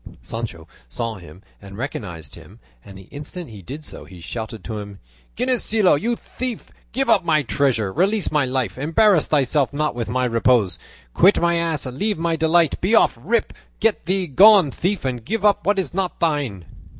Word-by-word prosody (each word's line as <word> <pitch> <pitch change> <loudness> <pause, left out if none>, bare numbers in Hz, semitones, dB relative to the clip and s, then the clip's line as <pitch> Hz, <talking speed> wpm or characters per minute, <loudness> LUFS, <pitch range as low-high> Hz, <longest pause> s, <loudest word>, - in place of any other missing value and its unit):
Sancho 105 -8 -6 0.2
saw 115 - -3
him 90 +1 -14 0.2
and 100 0 -11
recognised 90 - -6
him, - - -14 0.2
and 95 - -12
the 95 - -12
instant 150 +1 -8
he 105 -3 -10
did 140 - -9
so - - -9
he 90 - -13
shouted 110 +5 -7
to 110 -2 -5
him, 100 -1 -9 0.4
"Ginesillo, 230 -5 +2
you 235 +11 0
thief, 250 0 -6 0.2
give 270 +3 -1
up - - +4
my 155 -3 +2
treasure, 115 -4 0
release 200 - +1
my 150 -2 +2
life, 130 -4 -2
embarrass 165 +4 +3
thyself 140 -1 +1
not 150 +1 -1
with 120 -2 -4
my 130 +2 0
repose, 115 -5 +2 0.3
quit 195 +3 +5
my 170 0 +2
ass, 165 -4 -1
leave 190 - -2
my 165 0 0
delight, 160 0 +2
be 200 +6 +2
off, - - +4
rip, 225 - 0 0.3
get 220 -5 0
thee 190 0 0
gone, 190 +1 +6
thief, 190 +1 -2
and 125 -3 -3
give 215 - -2
up 200 -4 +2
what 205 0 +3
is 180 -7 -2
not 190 -1 -2
thine." 140 - -1
145 Hz, 185 wpm, -21 LUFS, 115-190 Hz, 0.4 s, gone